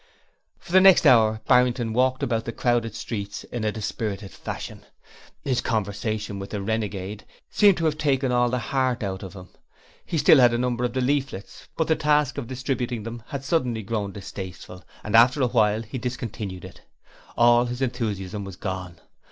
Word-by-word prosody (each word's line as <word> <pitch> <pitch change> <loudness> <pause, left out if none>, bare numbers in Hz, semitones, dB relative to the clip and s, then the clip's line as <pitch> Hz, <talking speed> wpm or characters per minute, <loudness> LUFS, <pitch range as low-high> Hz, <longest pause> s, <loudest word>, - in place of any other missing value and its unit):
For - - -14
the 185 +1 +6
next 190 -3 +7
hour 110 -5 +5
Barrington 125 -2 +3
walked 130 +2 +1
about 115 -2 -1
the 115 - -3
crowded 120 -2 0
streets 100 -2 -5
in 120 -2 -6
a 105 - +1
dispirited 105 -2 -4
fashion. - - -7 0.6
His 130 -3 0
conversation 105 -1 -2
with 100 - -7
the 105 - -4
renegade 105 -1 -3 0.3
seemed 205 -3 +5
to 165 - -1
have 155 -1 0
taken 135 -3 +1
all 120 0 +2
the 125 - -1
heart 130 -1 -1
out 95 -1 -3
of 95 -1 -8
him. 90 -2 -11 0.5
He 170 - -3
still 145 0 +6
had 120 -2 +5
a - - +1
number 125 0 -1
of 120 -1 -1
the 130 - -1
leaflets, 135 -6 -2
but 160 - +1
the 160 - +3
task 150 -2 +1
of 125 - -6
distributing 125 -3 -3
them 115 +1 -7
had 135 -1 -6
suddenly 125 -8 0
grown 105 -1 -3
distasteful 95 -2 -9 0.2
and 105 +1 -1
after 125 +5 +6
a - - +3
while 110 -2 +2
he 115 +4 -6
discontinued 115 -6 -5
it. - - -13 0.6
All 120 0 +5
his 125 +2 -3
enthusiasm 105 -5 -3
was 95 -2 -8
gone. 90 -3 -6
120 Hz, 185 wpm, -24 LUFS, 105-130 Hz, 0.6 s, next